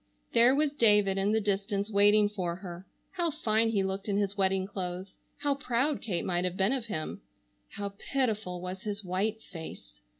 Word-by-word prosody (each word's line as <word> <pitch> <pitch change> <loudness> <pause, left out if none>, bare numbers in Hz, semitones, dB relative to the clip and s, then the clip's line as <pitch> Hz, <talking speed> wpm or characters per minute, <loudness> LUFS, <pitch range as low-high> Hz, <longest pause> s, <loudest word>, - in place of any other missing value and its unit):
There 240 +3 +6
was 300 0 +2
David 210 -7 +4
in 200 +2 +2
the 220 - +3
distance 200 0 -1
waiting 205 +1 +5
for 185 -5 -3
her. 180 0 -9 0.2
How 345 -3 0
fine 225 -5 +1
he 205 -3 +1
looked 190 +2 -3
in 200 - +1
his 200 -1 0
wedding 190 -1 +2
clothes! 185 -1 -5 0.2
How 285 -1 +1
proud 275 +1 0
Kate 185 -6 -2
might 175 -1 0
have 180 0 -2
been 195 +6 +3
of 250 -4 -3
him! 155 -7 -4 0.5
How 200 -1 -4 0.2
pitiful 215 -9 0
was 185 +1 -5
his 210 0 -4
white 205 +5 -1
face! 160 - -9
200 Hz, 185 wpm, -30 LUFS, 190-220 Hz, 0.5 s, There